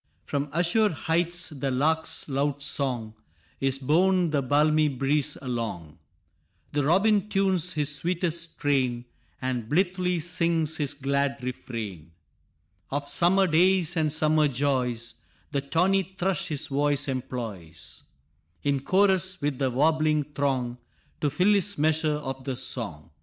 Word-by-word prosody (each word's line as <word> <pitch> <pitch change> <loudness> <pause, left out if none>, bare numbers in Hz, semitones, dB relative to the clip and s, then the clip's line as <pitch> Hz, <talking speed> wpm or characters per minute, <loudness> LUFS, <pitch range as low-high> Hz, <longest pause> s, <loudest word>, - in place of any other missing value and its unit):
From 145 0 -2
azure 180 +7 +2
heights 170 +2 -1
the 140 -3 -3
lark's 155 +5 0
loud 140 0 -1
song 130 -6 0 0.5
Is 135 0 0
borne 175 +5 +2
the 145 -2 +1
balmy 150 +3 +3
breeze 145 +2 0
along; 110 - -5 0.7
The 145 - 0
robin 200 +6 +3
tunes 190 -3 +1
his 150 -1 0
sweetest 170 0 -1
strain, 130 -4 0 0.3
And 125 -3 -3
blithely 180 +1 +1
sings 165 -2 0
his 145 -2 -2
glad 140 0 0
refrain 105 -10 -6 0.8
Of 140 +1 -3
summer 190 +5 +3
days 180 0 +3
and 155 -2 +1
summer 155 0 +3
joys; 125 -3 -1 0.3
The 140 -2 0
tawny 185 +6 +1
thrush 190 0 0
his 150 -3 -2
voice 145 +1 0
employs, 115 - -6 0.6
In 140 -1 +1
chorus 190 +3 +2
with 145 -3 -2
the 135 -2 +1
warbling 155 +3 +2
throng, 130 -4 -1 0.4
To 145 - +1
fill 180 +9 +3
his 200 0 0
measure 155 0 +2
of 135 -3 -5
the 130 -1 -3
song. 90 - -3
145 Hz, 130 wpm, -26 LUFS, 130-170 Hz, 0.8 s, balmy